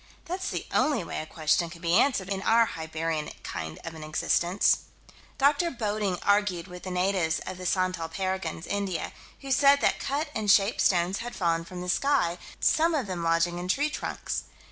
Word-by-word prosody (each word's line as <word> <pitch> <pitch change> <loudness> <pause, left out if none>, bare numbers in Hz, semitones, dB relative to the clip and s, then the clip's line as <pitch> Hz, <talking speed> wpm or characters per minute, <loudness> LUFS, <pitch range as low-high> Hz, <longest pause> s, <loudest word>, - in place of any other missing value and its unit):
That's 370 +2 -3
the - - -4
only 290 -10 +2
way - - -4
a 155 - -8
question 160 +2 +1
can 170 0 -11
be 170 0 0
answered 210 -2 +3
in 195 0 -2
our 230 +3 +4
Hibernian 160 -2 -3
kind 80 -2 -5
of 165 - -6
an 160 -1 -9
existence. 175 +4 +2 0.6
Dr. 285 +5 +3
Bodding 210 - -1
argued 200 -4 +2
with 180 0 -10
the 185 - -6
natives 180 -3 +1
of 185 - -6
the 185 - -3
Santal 185 -3 0
Parganas, 185 -2 -3
India, 200 -4 -2 0.3
who 275 - -6
said 280 +1 +6
that - - +2
cut 290 +3 -2
and 215 -2 -2
shaped 195 +2 +4
stones 180 +1 +2
had 240 +1 -6
fallen 165 -2 0
from 180 +1 -8
the 180 - -6
sky, 180 -8 +1 0.2
some 325 +1 +3
of 275 -6 0
them 185 -3 -4
lodging 170 +1 +1
in 180 - -5
tree 290 +10 +1
trunks. - - -4
185 Hz, 190 wpm, -27 LUFS, 170-225 Hz, 0.6 s, said